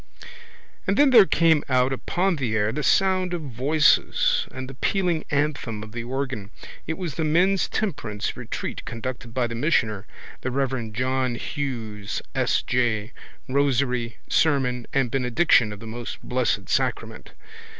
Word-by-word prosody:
And 195 +2 +1
then 285 -1 +5
there 220 -6 +8
came 160 -3 +3
out 130 0 +3
upon 180 +6 0
the 120 -6 -1
air 105 0 +1
the 150 - -3
sound 185 +4 +2
of 170 - -4
voices 155 - +2
and 130 0 -7
the 135 - -8
pealing 175 +3 0
anthem 140 -7 -1
of 110 - -10
the 120 +1 -5
organ. 130 -5 -3 0.4
It 160 - -2
was 175 -6 -4
the 160 - -2
men's 180 +5 +2
temperance 125 - -3
retreat - - -5
conducted 120 0 -6
by 125 +1 0
the 115 - -4
missioner, 115 -6 0 0.3
the 130 - -2
reverend 130 -4 -2
John 130 0 0
Hughes 115 -8 -4
S. - - +1
J., 120 -3 0 0.4
rosary, 130 -3 0
sermon 130 -6 +1
and 130 -4 +1
benediction 125 -2 +3
of 105 - -8
the 115 - -10
Most 115 +1 -6
Blessed 125 -2 0
Sacrament. - - -2
130 Hz, 150 wpm, -24 LUFS, 115-160 Hz, 0.4 s, there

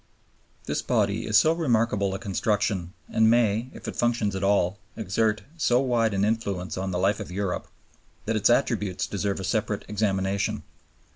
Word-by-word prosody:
This - - -1
body - - 0
is 105 - +4
so 155 +9 +5
remarkable 115 - +1
a - - -2
construction 100 -3 -1
and 110 0 +3
may, 115 0 +2
if - - -10
it - - -4
functions 120 -4 0
at 95 - -3
all, 100 -1 +2 0.2
exert 105 0 0
so 125 -6 +3
wide 120 -5 +1
an 95 +1 +2
influence 100 -5 -2
on 95 0 -3
the 90 - -2
life 95 +4 +1
of 105 - -6
Europe, 95 0 -2 0.6
that 115 - -1
its 105 +1 +3
attributes 105 -7 +1
deserve 100 -1 -2
a - - -5
separate 105 0 -1
examination. 100 -1 -1
105 Hz, 165 wpm, -26 LUFS, 95-115 Hz, 0.6 s, so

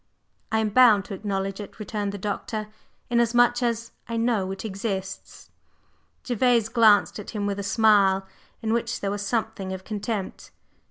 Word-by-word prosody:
"I 220 - +2
am 215 - 0
bound 215 -3 +5
to 215 - -7
acknowledge 195 0 -3
it," 205 - -9
returned 210 -1 -3
the 205 - -6
Doctor; 210 +2 -4 0.4
"inasmuch 240 +1 +3
as 230 -1 -1 0.2
I 230 - -2
know 225 -5 +1
it 195 +3 -6
exists." 195 -2 -5 0.7
Gervase 240 -2 +2
glanced 220 -3 +4
at 205 - -8
him 210 -3 -3
with 200 0 -2
a - - -3
smile, 200 -3 +4 0.4
in 220 0 0
which 235 0 -1
there 200 - -1
was 205 0 -3
something 220 -3 -2
of 190 0 -7
contempt. 210 -1 -4
210 Hz, 160 wpm, -25 LUFS, 200-230 Hz, 0.7 s, bound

